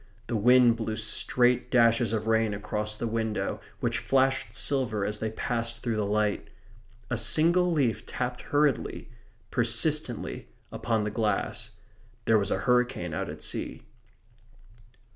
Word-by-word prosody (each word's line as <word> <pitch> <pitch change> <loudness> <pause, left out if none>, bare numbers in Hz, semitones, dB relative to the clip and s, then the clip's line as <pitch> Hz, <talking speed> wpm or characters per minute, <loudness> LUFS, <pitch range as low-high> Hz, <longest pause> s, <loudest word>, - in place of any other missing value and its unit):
The 120 - -3
wind 120 +2 +5
blew 110 -1 -3
straight 125 +3 +1
dashes 115 -2 +3
of 110 -1 -2
rain 110 -2 +1
across 105 +1 -3
the 120 - -3
window, 110 -1 -2 0.2
which - - 0
flashed 135 0 +1
silver 120 -7 +1
as 105 +1 -3
they 110 - -2
passed 115 +1 -3
through 115 -3 -1
the 105 -2 -1
light. 105 0 0 0.6
A 120 - 0
single 175 +8 +3
leaf 135 -9 0
tapped 125 0 -4
hurriedly, 145 -3 0 0.4
persistently, - - 0 0.2
upon 110 -2 -1
the 105 - -2
glass. 105 -2 -2 0.6
There 110 -1 +4
was 100 0 -1
a - - 0
hurricane 125 - +1
out - - -3
at - - -8
sea. - - -4
115 Hz, 140 wpm, -27 LUFS, 105-125 Hz, 0.6 s, wind